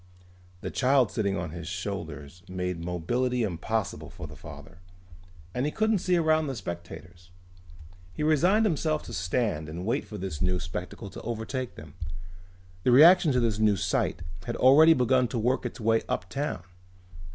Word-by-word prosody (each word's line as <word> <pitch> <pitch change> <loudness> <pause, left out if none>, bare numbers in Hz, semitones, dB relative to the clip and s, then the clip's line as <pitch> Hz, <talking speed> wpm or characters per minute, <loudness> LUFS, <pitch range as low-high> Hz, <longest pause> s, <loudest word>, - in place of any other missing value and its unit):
The - - -4
child 130 -3 +3
sitting 100 -3 -1
on 85 -2 -4
his 85 -1 -7
shoulders 85 -4 -6
made 90 -2 -3
mobility 120 +9 -1
impossible 105 +3 -2
for - - -9
the - - -10
father. - - -12 0.7
And 125 - -1
he - - -1
couldn't 220 +1 +1
see 180 0 +1
around 160 -2 +2
the 135 - -3
spectators. 85 -2 -8 0.8
He 150 - -4
resigned 175 +8 +4
himself 155 -4 0
to - - -9
stand 85 -2 -1
and 85 +4 -6
wait 120 +6 0
for 105 - -8
this 95 -6 -5
new 90 0 +1
spectacle 90 +5 -6
to - - -9
overtake 120 +3 -4
them. 75 -1 -11 0.9
The 125 - +1
reaction 160 +5 +7
to 125 - +3
this 115 -3 0
new 105 -2 +3
sight 90 -2 -1 0.2
had 120 - -2
already 155 +6 +7
begun 125 -1 +3
to 120 - -4
work 125 +3 +1
its 120 - -10
way 115 0 +2
uptown. 90 +3 -3
110 Hz, 165 wpm, -27 LUFS, 90-135 Hz, 0.9 s, reaction